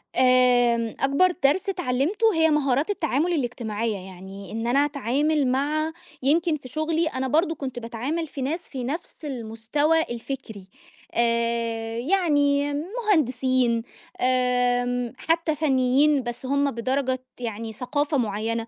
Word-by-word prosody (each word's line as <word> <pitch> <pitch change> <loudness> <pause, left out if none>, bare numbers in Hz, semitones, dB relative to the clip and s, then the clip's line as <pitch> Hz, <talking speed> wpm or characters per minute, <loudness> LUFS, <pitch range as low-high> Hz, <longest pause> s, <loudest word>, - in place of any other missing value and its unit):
آمم، 245 -3 +3
أكبر 280 +7 +3
درس 300 +8 +3
اتعلّمته 365 - +1
هي 320 -1 +4
مهارات 285 0 +1
التعامل 335 -3 0
الإجتماعية 230 -6 -2
يعني، 190 +1 -10
إن 225 +1 -3
أنا 275 +4 +3
أتعامل 285 +1 0
مع 295 +5 0 0.3
يمكن 320 +3 +2
في 270 - -12
شغلي، 315 +5 0
أنا 265 -3 -2
برضه 325 +5 +2
كنت 260 -4 -5
باتعامل 250 +8 -3
في 275 - -7
ناس 295 +6 -1
في 260 -6 -7
نفس 295 +8 -5
المستوى 265 +5 0
الفكري، 235 -6 -6 0.5
آآ 230 -1 0
يعني 290 -2 +2
مهندسين، 265 - +1 0.4
آمم 245 -1 +1
حتى 330 0 0
فنيين، 275 -1 +3
بس 240 +2 -6
هُم 280 +1 +1
بدرجة 260 +2 -1 0.2
يعني 225 -1 -5
ثقافة 290 +5 -1
معيّنة 225 0 -1
260 Hz, 120 wpm, -24 LUFS, 235-300 Hz, 0.5 s, هي